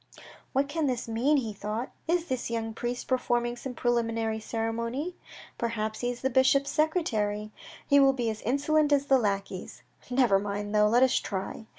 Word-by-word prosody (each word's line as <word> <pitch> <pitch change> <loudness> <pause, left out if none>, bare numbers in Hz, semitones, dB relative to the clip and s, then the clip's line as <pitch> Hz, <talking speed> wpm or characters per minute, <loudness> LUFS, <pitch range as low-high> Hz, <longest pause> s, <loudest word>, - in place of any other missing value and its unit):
"What 275 +1 +1
can 305 +1 -1
this 250 -2 -2
mean," 245 +7 +2
he 225 -6 -2
thought. 210 +5 -4 0.2
"Is 340 0 +1
this 255 -7 -3
young 225 -1 -2
priest 240 +2 -4
performing 240 -2 0
some 250 +1 -7
preliminary 230 -2 0
ceremony? 230 +9 -3 0.4
Perhaps 220 -2 -2
he 245 - -1
is 245 0 -5
the 265 - +1
bishop's 265 +2 +3
secretary. 215 - 0 0.4
He 285 - +6
will 275 -1 +6
be 245 -3 -2
as 215 - -7
insolent 290 +4 +2
as 280 -1 +3
the 270 -1 +4
lackeys. 195 -4 -3 0.3
Never 245 -6 +4
mind 205 +1 -4
though! 210 0 +5
Let 240 +4 +4
us 260 0 +3
try." 195 +3 -5
240 Hz, 175 wpm, -28 LUFS, 220-270 Hz, 0.4 s, He